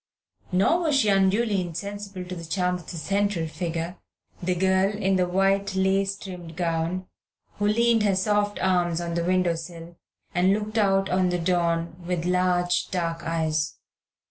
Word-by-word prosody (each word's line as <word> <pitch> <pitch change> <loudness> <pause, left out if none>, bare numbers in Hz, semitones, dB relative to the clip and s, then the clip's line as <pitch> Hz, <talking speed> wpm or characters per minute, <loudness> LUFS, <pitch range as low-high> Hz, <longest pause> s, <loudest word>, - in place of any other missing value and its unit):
Nor 195 - +3
was 315 -5 +1
she 255 -6 +3
unduly 200 +1 +2
insensible 195 +2 -6
to 180 0 -6
the 170 - -7
charm 180 +2 0
of 180 -2 -6
the 170 - -6
central 200 0 0
figure, 165 +2 -4 0.4
the 180 0 0
girl 190 +2 +3
in 195 -2 0
the 180 -1 +2
white 195 +2 +1
lace 195 +1 +1
trimmed 180 -5 -9
gown 170 +1 -1 0.5
who 205 - +2
leaned 230 +1 +3
her 205 -2 +2
soft 205 +1 +1
arms 175 -2 +2
on 170 -1 -3
the 170 0 0
window 180 -1 +2
sill 165 +1 -8 0.4
and 180 +2 +3
looked 215 +2 -1
out 195 -2 +3
on 185 0 +2
the 180 - 0
dawn 170 -1 0
with 175 -1 -2
large 180 -1 +1
dark 170 -2 -2
eyes. 160 -2 -1
185 Hz, 165 wpm, -25 LUFS, 170-195 Hz, 0.5 s, Nor